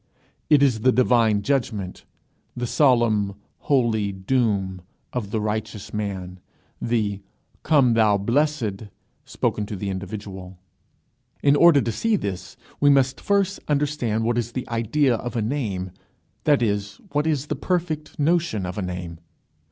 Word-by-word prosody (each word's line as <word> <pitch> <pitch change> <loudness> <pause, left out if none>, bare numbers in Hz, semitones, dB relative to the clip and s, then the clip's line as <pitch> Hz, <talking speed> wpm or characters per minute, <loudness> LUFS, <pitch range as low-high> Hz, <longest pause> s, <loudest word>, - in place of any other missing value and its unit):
It 145 -2 +6
is 125 -5 +3
the 130 +4 +4
divine 115 -4 +3
judgment, 110 -8 -2 0.5
the 120 - -2
solemn 115 -7 +2 0.3
holy 115 -7 +2
doom 95 -2 0 0.3
of 120 -5 -3
the 110 - -1
righteous 105 -1 -4
man, 95 -3 -4 0.4
the 105 -4 -1 0.4
"Come, 135 -6 +4
thou 110 -3 +4
blessed," 115 -2 0 0.4
spoken 105 -1 -2
to 105 - -5
the 100 +1 -3
individual. 95 -1 -7 0.9
In 140 0 +5
order 165 -2 +6
to 115 0 -1
see 225 - +1
this, 100 - -5 0.2
we 145 - +5
must 135 -2 +3
first 200 -1 +1
understand 140 -7 0
what 120 +1 +1
is 120 0 -4
the 130 - -4
idea 120 +3 +1
of 120 +2 -6
a 115 - 0
name, 105 -8 -2 0.5
that 145 -5 +4
is, 100 -2 -1 0.2
what 150 +2 0
is 150 -3 0
the - - -3
perfect 170 -4 -2
notion 155 - +1
of 90 +3 -4
a - - -1
name. 90 -2 -5
115 Hz, 145 wpm, -23 LUFS, 100-140 Hz, 0.9 s, It